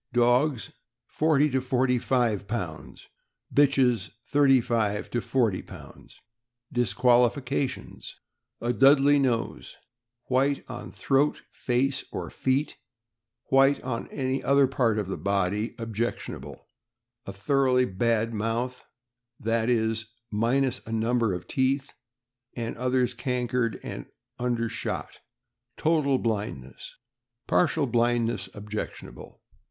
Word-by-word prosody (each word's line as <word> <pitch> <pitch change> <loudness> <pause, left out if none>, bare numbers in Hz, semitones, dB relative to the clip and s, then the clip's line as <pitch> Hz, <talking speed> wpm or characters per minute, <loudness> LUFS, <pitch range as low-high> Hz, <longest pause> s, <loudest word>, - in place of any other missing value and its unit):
— 130 - -37
Dogs, 125 +1 +1 0.3
forty 150 +2 +2
to 130 0 +1
forty 125 -1 +1
five 115 -6 0
pounds; 90 -8 -5 0.5
bitches, 130 -7 +3 0.2
thirty 140 -2 +4
five 110 -3 -1
to 120 - -1
forty 115 -8 0
pounds. - - -14 0.5
Disqualifications. 125 +4 +1 0.2
— - - -53
A - - +2
Dudley 140 +4 +5
nose; 120 -4 -1 0.5
white 135 +2 0
on 125 -1 -7
throat, 140 +2 +1
face, 130 +2 0
or - - -5
feet 135 +3 -1 0.7
(white 135 +1 +5
on 125 -2 -3
any 130 -1 -2
other 140 0 +4
part 125 -4 +1
of 105 -3 -2
the 95 - -4
body 100 +3 -1
objectionable); 115 0 -5 0.6
a - - -4
thoroughly 125 +5 +2
bad 115 +2 0
mouth 115 +4 -2 0.4
— 120 -2 -24
i. 115 0 +1
e., 110 -2 +2 0.4
minus 125 +4 +1
a - - -6
number 115 0 +1
of 90 -1 -5
teeth, 135 +1 0 0.6
and 115 -1 -4
others 125 0 0
cankered; 125 -2 -1
also - - -6 0.3
undershot; 120 -2 -3 0.6
total 150 -4 +2
blindness 100 - -4 0.5
(partial 160 -3 +2
blindness 120 -4 0
objectionable). 105 +1 -7
120 Hz, 110 wpm, -26 LUFS, 115-135 Hz, 0.7 s, Dudley